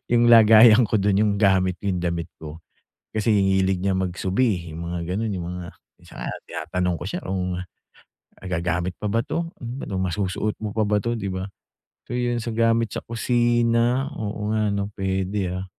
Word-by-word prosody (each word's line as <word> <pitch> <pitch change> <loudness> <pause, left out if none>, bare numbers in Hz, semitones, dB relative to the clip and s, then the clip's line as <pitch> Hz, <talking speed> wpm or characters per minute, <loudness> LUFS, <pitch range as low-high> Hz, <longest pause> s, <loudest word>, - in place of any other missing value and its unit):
yung 120 0 +4
lagayan 110 +1 +8
ko 110 - +2
dun 100 0 +2
yung 105 -1 +3
gamit, 95 -2 +3
yung 95 -3 -1
damit 85 0 -2
ko. 80 0 -9 0.6
Kasi 110 0 +1
hilig 95 -2 +2
niya 95 -1 +1
mag-subi, 95 +1 0
yung 85 +2 -6
mga 85 +1 -3
ganun, 110 0 -1
yung 85 -2 -4
mga 90 -1 -6 0.3
minsan - - -16
nga - - -3 0.2
tinatanong 90 -1 -2
ko - - -4
siya, - - -4
kung 90 -1 -2 0.8
magagamit 90 -1 -2
pa 105 - -3
ba 115 +2 0
ito? 170 0 -2
Ano 120 -5 -5
masusuot 95 +3 -1
mo 110 - -2
pa 110 -1 0
ba 105 -1 +1
ito? 120 0 -2
Di 100 -2 -4
ba? 95 0 -3 0.7
So 120 - -3
yun 120 -1 0
sa 115 - -4
gamit 115 -1 +2
sa - - -4
kusina, 120 +2 +1
oo 105 0 -3
nga 105 -1 +1
ano 100 0 -1
pwede 95 0 -1
ah, 95 - -5
100 Hz, 180 wpm, -23 LUFS, 90-115 Hz, 0.8 s, lagayan